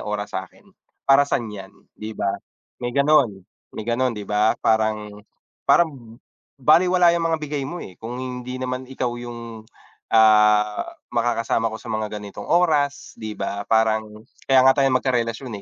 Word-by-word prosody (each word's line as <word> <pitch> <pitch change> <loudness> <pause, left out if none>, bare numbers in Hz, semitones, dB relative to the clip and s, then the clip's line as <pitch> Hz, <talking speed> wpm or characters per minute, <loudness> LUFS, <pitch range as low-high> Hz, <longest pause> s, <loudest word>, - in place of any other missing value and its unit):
oras 105 0 -4
sa'kin. 95 0 -7 0.4
Para 140 +1 +5
san 120 - 0
yan, 95 -2 -10 0.2
'di 110 0 -8
ba? 100 - 0 0.5
May 120 - -1
ganon, 140 -9 +3 0.3
may - - -5
ganon, 125 +1 +1
'di 105 - -6
ba? 105 +1 +2
Parang 110 -1 0 0.4
parang 130 -9 +1 0.4
balewala 175 +5 +5
yang 170 -1 -1
mga 165 -1 0
bigay 145 -1 -3
mo, 175 +6 -6
eh, 95 - -9
kung 120 +2 -6
hindi 125 0 -6
naman 130 0 -3
ikaw 130 -1 -3
yung, 115 -2 -8 0.5
ah, 105 -1 +5 0.3
makakasama 115 -1 0
ko - - -4
sa 120 - -11
mga 110 -1 -3
ganitong 100 -1 -9
oras, 150 -5 +1
'di 110 -2 -6
ba? 100 0 -3
Parang 110 -1 +1 0.2
kaya 135 -1 +5
nga 130 - +7
tayong 135 -1 +3
magkarelasyon, 120 -2 -2
115 Hz, 155 wpm, -22 LUFS, 110-135 Hz, 0.5 s, nga